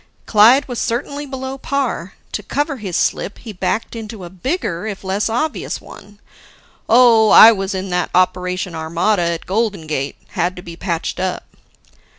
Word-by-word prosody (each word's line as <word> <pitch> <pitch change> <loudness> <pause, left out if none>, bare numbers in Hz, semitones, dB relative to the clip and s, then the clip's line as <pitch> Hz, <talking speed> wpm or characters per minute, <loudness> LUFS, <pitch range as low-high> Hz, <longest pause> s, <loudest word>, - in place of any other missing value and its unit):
Clyde 235 +6 +5
was 245 -3 -4
certainly 280 +4 -3
below 265 0 -6
par. 260 -10 -2 0.2
To - - -3
cover 285 +7 -2
his 195 -7 -5
slip 205 - -1
he 225 -3 -9
backed 215 +5 -2
into 220 -3 -7
a 175 - -9
bigger, 190 - -3
if 200 -2 -6
less 195 +3 -1
obvious, 300 +7 -2
one. 205 0 -14 0.7
"Oh, 230 -2 +6
I 225 - +10
was 195 -2 -2
in 190 0 -4
that 180 -1 0
Operation 180 0 0
Armada 170 +5 0
at 170 -1 -2
Golden 200 -4 -1
Gate. 145 -3 -3
Had 180 +2 -1
to 180 - -10
be 170 - -9
patched 170 -1 -3
up." 185 -1 -2
205 Hz, 160 wpm, -18 LUFS, 180-235 Hz, 0.7 s, I